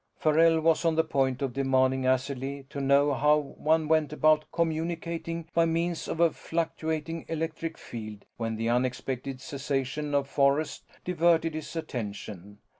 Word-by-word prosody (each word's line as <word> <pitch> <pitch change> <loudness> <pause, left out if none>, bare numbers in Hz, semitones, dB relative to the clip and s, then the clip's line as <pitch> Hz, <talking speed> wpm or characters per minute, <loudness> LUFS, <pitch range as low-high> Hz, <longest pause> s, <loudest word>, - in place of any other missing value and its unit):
Farrell 160 +1 +4
was 165 +1 +3
on 165 -1 +2
the 160 - +3
point 135 -3 0
of 135 -3 -2
demanding 130 -1 +2
acidly 135 +1 -1
to 140 - -4
know 140 +1 +4
how 150 +2 +4
one 155 +2 0
went 155 -1 +2
about 155 0 +3
communicating 165 0 -2
by 170 - +4
means 165 +1 -1
of - - -4
a 170 -1 +5
fluctuating 165 -1 -3
electric 165 0 -3
field 110 -3 -8
when 115 -1 -2
the 115 +1 -2
unexpected 130 +2 -1
cessation 140 +1 -2
of 140 -1 +1
forest 140 +2 +1 0.2
diverted 165 -2 +2
his 155 +1 -6
attention. 105 - -6
150 Hz, 145 wpm, -28 LUFS, 130-160 Hz, 0.2 s, a